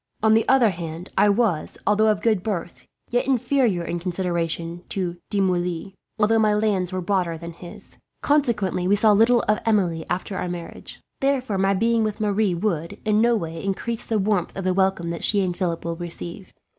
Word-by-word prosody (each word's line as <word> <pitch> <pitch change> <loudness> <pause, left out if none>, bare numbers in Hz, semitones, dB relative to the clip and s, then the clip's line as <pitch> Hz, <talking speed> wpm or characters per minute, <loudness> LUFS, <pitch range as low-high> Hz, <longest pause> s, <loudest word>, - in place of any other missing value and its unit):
On 220 0 +5
the 225 0 +3
other 255 -5 +5
hand, 165 0 -7
I 205 +2 +4
was, 200 -6 0
although 215 +1 +3
of 210 - 0
good 220 -5 +2
birth, 175 -4 -5 0.2
yet 245 +1 +1
inferior 250 -7 +1
in 170 +1 -3
consideration 170 -1 -3
to 180 -3 -3
De 205 - 0
Moulins, 180 -1 -1 0.2
although 225 +1 +3
my 215 -1 +3
lands 200 -4 0
were 185 0 -2
broader 180 -3 0
than 170 +1 -8
his. 175 +1 -13 0.2
Consequently 215 -11 +1
we 200 - +4
saw 215 +1 +4
little 230 +4 +4
of 215 +1 +1
Emilie, 180 -7 +1
after 185 +2 -3
our 180 - -3
marriage. 175 -1 -8 0.2
Therefore 260 -7 0
my 195 +1 +2
being 230 +3 +2
with 215 0 -2
Marie 205 -3 +1
would, 170 -3 -2
in 215 0 +3
no 235 0 +4
way, 165 -5 -4
increase 220 +4 -2
the 225 - +1
warmth 200 -3 0
of 195 - -3
the 185 0 +1
welcome 190 -2 +1
that 170 -1 -5
she 200 -2 +3
and 180 -2 -2
Philip 175 -3 -2
will 170 0 -3
receive. 175 +2 -5
195 Hz, 195 wpm, -23 LUFS, 175-220 Hz, 0.2 s, On